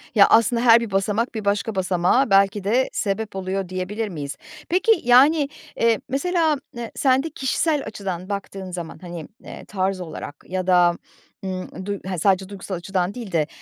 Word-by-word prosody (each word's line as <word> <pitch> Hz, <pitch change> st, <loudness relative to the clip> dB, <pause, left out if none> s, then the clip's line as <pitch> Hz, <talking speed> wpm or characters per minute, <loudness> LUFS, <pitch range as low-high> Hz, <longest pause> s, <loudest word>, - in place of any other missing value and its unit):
Ya, 200 Hz, -2 st, +7 dB
aslında 230 Hz, +1 st, +4 dB
her 235 Hz, -1 st, +7 dB
bir 230 Hz, -3 st, -5 dB
basamak, 210 Hz, +5 st, 0 dB
bir 215 Hz, -2 st, -4 dB
başka 205 Hz, +2 st, 0 dB
basamağa 190 Hz, +7 st, +2 dB
belki 195 Hz, +1 st, +3 dB
de 240 Hz, +7 st, +2 dB
sebep 210 Hz, 0 st, -2 dB
oluyor, 190 Hz, 0 st, -3 dB
diyebilir 185 Hz, +4 st, -3 dB
miyiz? 145 Hz, -5 st, -5 dB, 0.3 s
Peki, 370 Hz, +6 st, +3 dB
yani, 275 Hz, +5 st, +5 dB, 0.3 s
eee, 230 Hz, -1 st, +3 dB
mesela, 320 Hz, +2 st, +1 dB, 0.2 s
eee, 235 Hz, -1 st, -5 dB
sen 265 Hz, -1 st, +3 dB
de 325 Hz, -, -4 dB
kişisel 300 Hz, +1 st, 0 dB
açıdan 190 Hz, -3 st, -5 dB
baktığın 195 Hz, -2 st, -5 dB
zaman. 170 Hz, -2 st, -6 dB
Hani, 175 Hz, -4 st, -7 dB, 0.2 s
eee, -, -, -10 dB
tarz 190 Hz, -1 st, -2 dB
olarak 160 Hz, -3 st, -7 dB
ya 185 Hz, 0 st, -3 dB
da, 175 Hz, -2 st, +4 dB, 0.5 s
ımm, 185 Hz, 0 st, -5 dB
du 200 Hz, -1 st, -3 dB
he 190 Hz, -1 st, -3 dB
sadece 190 Hz, +2 st, +2 dB
duygusal 195 Hz, -1 st, -6 dB
açıdan 180 Hz, +1 st, -2 dB
değil 230 Hz, -5 st, -7 dB
de 155 Hz, -4 st, +1 dB
200 Hz, 170 wpm, -22 LUFS, 185-235 Hz, 0.5 s, Ya